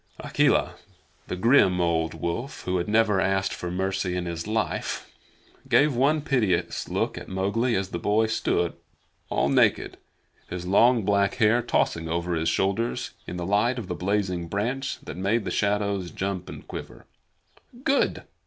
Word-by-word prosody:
Akela, - - +1 0.5
the - - -3
grim 95 -3 +4
old 80 -2 0
wolf 85 - -4
who 90 0 0
had 85 - -2
never 105 -2 +3
asked 95 0 +1
for 90 - -5
mercy 95 0 -1
in 90 -1 -2
his 85 +1 -4
life, 110 0 -2 0.6
gave 145 -2 +4
one 145 +5 +3
piteous 115 - 0
look - - -1
at - - -11
Mowgli 100 +6 0
as 95 -1 -1
the 85 - -4
boy 105 +5 +2
stood 110 0 0 0.6
all 70 - +1
naked, 70 - +2 0.5
his 90 0 -5
long 115 +5 +4
black 100 0 +2
hair 115 0 +3
tossing 85 -8 0
over 85 +1 -1
his 80 0 +1
shoulders 100 +7 -1 0.2
in 90 - -5
the 90 - -3
light 105 +6 +2
of 115 -6 -5
the - - -1
blazing 90 -2 -1
branch 115 +9 -2
that - - -8
made 105 +5 0
the - - -2
shadows 100 -3 0
jump 95 -1 -4
and - - -10
quiver. - - -8 0.8
"Good!" 280 0 +1
100 Hz, 160 wpm, -26 LUFS, 90-115 Hz, 0.8 s, grim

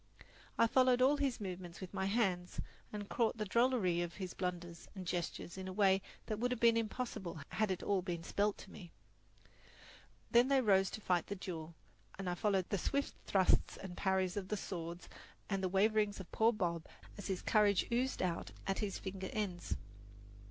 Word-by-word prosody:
I 230 - +6
followed 255 +1 +4
all 270 +3 +5
his 275 -4 0
movements 180 -3 -6
with 185 -1 -8
my 190 -1 0
hands, 190 -5 0 0.3
and 205 -1 -5
caught 230 +1 +1
the 215 - -1
drollery 215 -6 +3
of 170 -1 -3
his 185 -3 -5
blunders 175 -2 -4
and 190 -2 -6
gestures 175 +1 -3
in 190 - -5
a 185 - -4
way 195 -1 +4 0.2
that 215 -1 -3
would 245 +2 +1
have 250 -2 -2
been 235 -1 +6
impossible 220 -6 -3
had 215 -1 +1
it 185 - -2
all 200 -2 +2
been 175 -2 -4
spelled 205 +4 +1
to 195 - -11
me. 175 -5 -10 1.4
Then 240 +2 +6
they 275 0 +4
rose 195 -5 +4
to 220 - -6
fight 180 -3 +1
the 200 - -3
duel, 170 -4 -6 0.4
and 195 -1 -4
I 180 - +1
followed 190 0 +1
the 200 - 0
swift 280 +9 0
thrusts 190 -2 +3
and 190 -2 -7
parries 190 -1 +1
of 200 -2 -3
the 210 - -1
swords 170 -2 -5 0.4
and 195 -1 +1
the 185 - 0
waverings 210 +2 +2
of 190 - -9
poor 225 +1 +4
Bob 170 -7 -2 0.3
as 205 - -6
his 190 -2 -2
courage 205 -3 +4
oozed 250 0 +1
out 175 -2 -1 0.2
at 195 0 0
his 205 -3 -1
finger 190 -1 -5
ends. 190 -5 -2
195 Hz, 190 wpm, -36 LUFS, 180-215 Hz, 1.4 s, I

